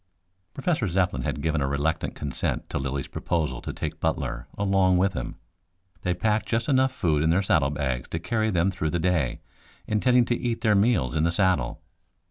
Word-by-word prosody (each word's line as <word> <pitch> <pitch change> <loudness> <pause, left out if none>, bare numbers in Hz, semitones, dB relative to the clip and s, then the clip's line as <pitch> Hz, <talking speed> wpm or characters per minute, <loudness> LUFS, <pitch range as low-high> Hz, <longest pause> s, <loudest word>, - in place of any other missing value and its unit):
Professor 145 - 0
Zepplin 90 -7 0
had 70 - -3
given 80 -2 +1
a 70 - +1
reluctant 70 +4 -1
consent 70 -3 -3
to - - -1
Lilly's 70 0 -2
proposal 75 -8 -2
to - - -5
take - - -5
Butler, 70 -7 -2
along 95 -2 +3
with 95 +1 +2
him. 85 0 -4 0.7
They 90 0 0
packed 110 +3 0
just 115 0 0
enough 130 -1 +3
food 80 -12 +1
in 80 - +2
their 90 +4 +3
saddle 75 -7 +3
bags 65 -4 -2
to - - -2
carry 110 +6 0
them 95 -1 +2
through 85 -5 -2
the 85 - -1
day, 80 -7 0 0.4
intending 125 +3 +3
to 120 - +1
eat 120 -1 -2
their 110 -3 +3
meals 100 - +2
in 80 - +2
the 85 - +3
saddle. 90 -8 +1
85 Hz, 190 wpm, -26 LUFS, 75-105 Hz, 0.7 s, along